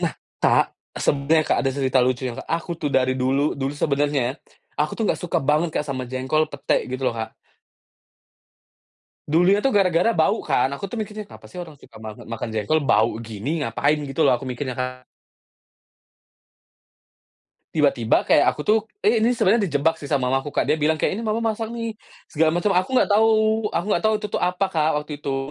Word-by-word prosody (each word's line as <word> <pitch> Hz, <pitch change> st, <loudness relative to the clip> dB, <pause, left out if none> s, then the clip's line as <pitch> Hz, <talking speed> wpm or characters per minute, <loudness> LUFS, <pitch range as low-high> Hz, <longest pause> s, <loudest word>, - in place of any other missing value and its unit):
Nah -, -, 0 dB, 0.3 s
Kak, -, -, +4 dB, 0.3 s
sebenarnya 150 Hz, +3 st, +2 dB
Kak -, -, +2 dB
ada 135 Hz, -, +2 dB
cerita 130 Hz, -1 st, +1 dB
lucu 130 Hz, +1 st, 0 dB
ya, 120 Hz, -, -3 dB
Kak. -, -, -8 dB
Aku 170 Hz, +1 st, -2 dB
tuh 145 Hz, -, -1 dB
dari 130 Hz, -1 st, +3 dB
dulu 135 Hz, +3 st, +1 dB
dulu 135 Hz, +1 st, -2 dB
sebenarnya, 145 Hz, -2 st, 0 dB, 0.4 s
aku 150 Hz, +1 st, 0 dB
tuh 225 Hz, -, -1 dB
nggak -, -, 0 dB
suka 180 Hz, -, -1 dB
banget 155 Hz, +4 st, +2 dB
Kak -, -, -4 dB
sama 130 Hz, -2 st, -3 dB
jengkol, 130 Hz, +5 st, 0 dB
pete, 140 Hz, -1 st, -1 dB
gitu 130 Hz, +1 st, -4 dB
loh, -, -, -4 dB
Kak. 110 Hz, 0 st, -4 dB, 2.0 s
Dulunya 180 Hz, +6 st, +4 dB
tuh 245 Hz, +3 st, +1 dB
gara-gara 185 Hz, +2 st, +3 dB
bau 160 Hz, -2 st, +2 dB
kan, 125 Hz, -, +2 dB
aku 140 Hz, +8 st, -5 dB
tuh 220 Hz, +3 st, -4 dB
mikirnya, 210 Hz, 0 st, -6 dB
"Kenapa -, -, -14 dB
sih 180 Hz, -, -12 dB
orang 170 Hz, -3 st, -7 dB
suka 115 Hz, -4 st, -15 dB
banget 110 Hz, -1 st, -9 dB
makan 115 Hz, 0 st, -4 dB
jengkol? 110 Hz, +9 st, +1 dB
Bau 110 Hz, 0 st, +2 dB
gini, 115 Hz, +7 st, -4 dB
ngapain?" 140 Hz, +6 st, +1 dB
gitu 140 Hz, +3 st, -3 dB
loh, 125 Hz, -, +4 dB
aku 135 Hz, -, -9 dB
mikirnya, 125 Hz, 0 st, -4 dB
Kak. 125 Hz, 0 st, -4 dB, 2.7 s
Tiba-tiba 140 Hz, -7 st, +2 dB
kayak 145 Hz, -, +5 dB
aku -, -, -6 dB
tuh, 215 Hz, +1 st, +5 dB, 0.2 s
eee, 220 Hz, +3 st, +3 dB
ini 240 Hz, -, +3 dB
sebenarnya 215 Hz, -2 st, +2 dB
dijebak 160 Hz, +1 st, +1 dB
sih -, -, -9 dB
sama 130 Hz, -4 st, +1 dB
mamaku, 135 Hz, +2 st, 0 dB
Kak, -, -, +1 dB
dia 155 Hz, -, +3 dB
bilang 155 Hz, +1 st, +2 dB
kaya, -, -, 0 dB
"Ini 230 Hz, -, -5 dB
mama 220 Hz, +1 st, 0 dB
masak 225 Hz, +1 st, -5 dB
nih", 230 Hz, -2 st, -4 dB, 0.3 s
segala 155 Hz, +1 st, +2 dB
macam, 175 Hz, +4 st, +1 dB
aku 185 Hz, +1 st, +1 dB
nggak -, -, +3 dB
tahu 220 Hz, +2 st, +4 dB, 0.4 s
aku 170 Hz, -, -1 dB
nggak 175 Hz, -, +1 dB
tahu 220 Hz, -, +4 dB
itu 210 Hz, -, -3 dB
tuh -, -, -2 dB
apa, 180 Hz, +2 st, +1 dB
Kak, 160 Hz, -3 st, +1 dB
waktu 150 Hz, -, -12 dB
itu. 135 Hz, -2 st, -2 dB
150 Hz, 195 wpm, -22 LUFS, 130-180 Hz, 2.7 s, kayak